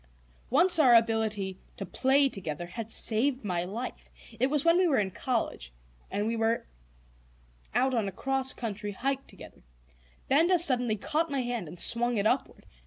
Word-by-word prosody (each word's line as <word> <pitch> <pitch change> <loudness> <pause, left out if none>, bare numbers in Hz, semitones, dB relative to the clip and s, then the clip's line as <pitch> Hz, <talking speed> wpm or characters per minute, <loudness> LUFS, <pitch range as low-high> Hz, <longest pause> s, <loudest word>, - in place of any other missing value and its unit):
Once 340 +6 +5
our 255 -6 +6
ability 220 -4 +1 0.2
to 195 - -5
"play 270 +8 +2
together" 175 - -5
had 220 +5 -7
saved 245 +3 0
my 175 -3 -1
life. 220 +8 -6 0.3
It 255 - +3
was 300 +1 0
when 335 +1 +5
we 370 - +3
were 290 - +2
in 195 -2 0
college 220 - -3 0.4
and 205 +1 -2
were 225 +1 0 1.1
out 260 +1 +2
on 225 -4 0
a - - -3
cross 265 +5 -1
country 210 -3 -5
hike 270 +6 -3
together; - - -13 0.7
Benda 330 +7 +4
suddenly 250 -9 +2
caught 310 +10 -1
my 275 -2 -1
hand 240 -7 -3
and 170 +3 -10
swung 235 +2 +2
it 200 - 0
upward. 250 +5 -1
240 Hz, 165 wpm, -28 LUFS, 205-270 Hz, 1.1 s, our